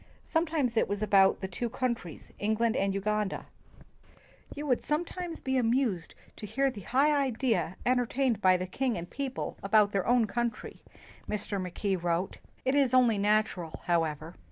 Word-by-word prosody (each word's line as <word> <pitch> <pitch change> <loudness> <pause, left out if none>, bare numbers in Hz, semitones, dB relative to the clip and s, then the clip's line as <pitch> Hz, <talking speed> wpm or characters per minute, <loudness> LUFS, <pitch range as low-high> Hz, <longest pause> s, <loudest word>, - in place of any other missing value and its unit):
Sometimes 315 -7 0
it - - +2
was 205 +1 -2
about 195 -2 +4
the 190 - -2
two 230 +6 -3
countries, 235 - -4
England 220 +2 +1
and 195 0 +1
Uganda. 210 +1 -1 0.4
' - - -31
' - - -18
You 295 - -5
would 255 -4 +1
sometimes 340 +2 -3
be 265 0 0
amused 230 -7 0 0.2
to 210 - -7
hear 270 +6 +1
the 210 -5 -9
high 280 +9 +2
idea 225 - 0
entertained 245 -2 +1
by 185 -1 +5
the 180 - -3
king 245 +5 -1
and 170 0 -5
people 270 +3 -5
about 205 +1 +4
their 195 -2 -1
own 245 -1 +4
country," 235 +2 -3 0.5
Mr. 205 -1 -2
Mackay 185 +2 -2
wrote, 175 +1 -1 0.3
"It 260 - +2
is 275 -3 +3
only 240 -5 +4
natural, 205 -5 0
however. 165 -2 0
220 Hz, 165 wpm, -29 LUFS, 195-255 Hz, 0.5 s, by